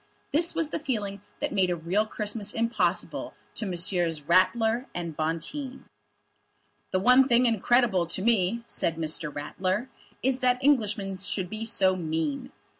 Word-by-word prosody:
This 335 +3 +2
was 325 -2 0
the - - -3
feeling 205 -9 -3 0.2
that - - -1
made 190 -2 +2
a 175 - +1
real 180 +6 0
Christmas 210 -1 -2
impossible 230 +1 -1 0.2
to 215 - -3
Messrs. 175 -3 0
Ratler 220 - +2
and 170 -3 -4
Bonteen. 210 - -3 1.0
"The 185 - +1
one 250 +5 +6
thing 245 -1 +4
incredible 225 -4 +2
to 185 +3 -2
me," 230 0 +2
said 165 - -1
Mr. 155 -1 -3
Ratler, 185 - -2 0.3
"is 260 0 +1
that 250 -1 +3
Englishmen 210 -8 +2
should 190 -1 -1
be 215 +1 -4
so 190 -5 +2
mean." 160 -4 -2
200 Hz, 145 wpm, -27 LUFS, 175-235 Hz, 1.0 s, one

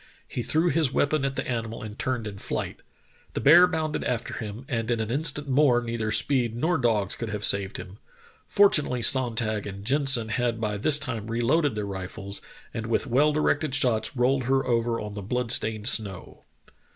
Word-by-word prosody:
He - - -4
threw 160 +8 +1
his 155 -6 +1
weapon 145 +1 +1
at 135 0 -2
the - - -3
animal 115 -3 -4
and 105 -1 -7
turned 125 -4 -2
in 100 -2 -7
flight. - - -4 0.6
The - - 0
bear 170 +5 +7
bounded 160 -3 -2
after 125 -1 -3
him, 110 +3 -7
and 115 -5 -3
in 120 -1 0
an 110 0 -3
instant 145 +1 0
more 135 -2 +3
neither 115 -2 -3
speed 120 0 +1
nor 160 +6 0
dogs 110 -6 +1
could 115 - -5
have 105 -1 -5
saved 100 -1 +1
him. 95 +3 -10 0.5
Fortunately 150 - +3
Sonntag 115 -5 +1
and 100 0 -8
Jen 140 +3 +1
sen 115 -5 +5
had 115 0 -1
by 105 -2 -2
this 145 +8 +3
time 120 -8 -4
reloaded 125 +5 +1
their 105 -1 -3
rifles, 100 +1 -7 0.3
and 115 0 -4
with 115 - 0
well 140 +4 +3
directed 150 -2 0
shots 120 -2 0
rolled 130 +1 +1
her 135 +1 +1
over 115 -1 0
on 105 -1 -6
the 100 - -6
blood 120 +4 -2
stained 110 0 +1
snow." 100 -7 -2
120 Hz, 190 wpm, -26 LUFS, 110-135 Hz, 0.6 s, bear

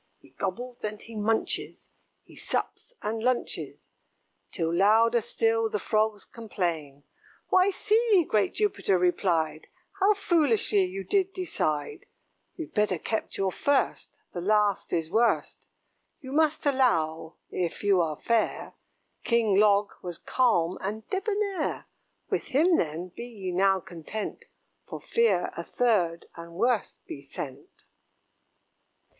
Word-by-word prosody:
He - - -22
gobbles 240 +6 -5
and 210 0 -4
he 230 - -12
munches, 220 +1 -1 0.3
He - - -17
sups - - -3
and 220 +1 -2
lunches; 250 +1 -2 0.6
Till 165 -1 -1
louder 225 +6 +4
still 225 +1 +1
the 210 - -1
Frogs 215 -1 0
complain. 165 -11 -4 0.5
"Why, 370 +1 +5
see!" 420 -1 +3
great 210 -2 +1
Jupiter 395 - +1
replied, 175 -3 0 0.3
"How 410 +2 +4
foolishly 280 - +2
you 190 +2 -5
did 385 - +1
decide. 345 - -2 0.5
You'd 330 -3 -7
better 210 -4 +1
kept 220 +7 -3
your 195 -1 0
first 285 +7 0 0.2
the 175 - -4
last 210 +1 +1
is 165 -1 -1
worst. 235 +1 +1 0.5
You 260 -4 -9
must 310 +1 +1
allow, 165 - +1 0.2
if 175 +1 -3
you 200 -3 +4
are 155 -3 -2
fair, 230 -2 0 0.5
King 230 -4 +2
Log 205 -1 +4
was 175 -2 -6
calm 185 -9 +1
and 215 +3 -5
debonair: 400 -3 -1 0.4
With - - -1
him, 325 +6 +3
then, 165 +3 -2
be 235 +6 -8
ye 200 -6 -6
now 190 +1 +3
content, 185 - -7 0.4
For - - -7
fear 465 0 +1
a - - -4
third, 190 -9 +1
and 170 0 -10
worse, 230 +4 0
be 140 - -8
sent." 140 0 -9
215 Hz, 125 wpm, -27 LUFS, 180-255 Hz, 0.6 s, Why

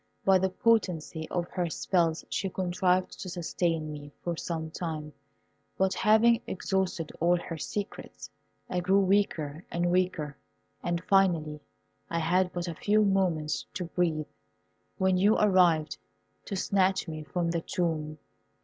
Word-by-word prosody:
By 190 -1 +6
the 190 +1 +1
potency 180 -7 0
of 175 -1 -2
her 175 -2 -2
spells 165 -1 0
she 195 - -2
contrived 180 0 0
to 185 - -5
sustain 165 -2 -1
me 145 -1 -8
for 170 -1 -2
some 160 -1 -4
time, 155 -3 -5 0.6
but 190 0 +2
having 225 +2 +4
exhausted 190 -4 -1
all 175 +2 +4
her 165 -2 -6
secrets, 205 +6 -5 0.4
I 180 - -1
grew 190 +3 +3
weaker 180 -6 +1
and 175 0 0
weaker, 180 -5 0 0.5
and 170 0 -2
finally 170 -6 +2 0.5
had 175 +3 +1
but 175 0 -4
a 170 - -3
few 210 +6 +2
moments 180 -6 0
to 180 - -3
breathe, 165 -3 0 0.7
when 190 -1 +2
you 205 +4 +4
arrived 175 -7 +3 0.5
to 200 - -4
snatch 190 0 +1
me 155 -1 -5
from 170 +2 -1
the 170 -1 -1
tomb. 155 -3 -2
175 Hz, 140 wpm, -29 LUFS, 160-190 Hz, 0.7 s, By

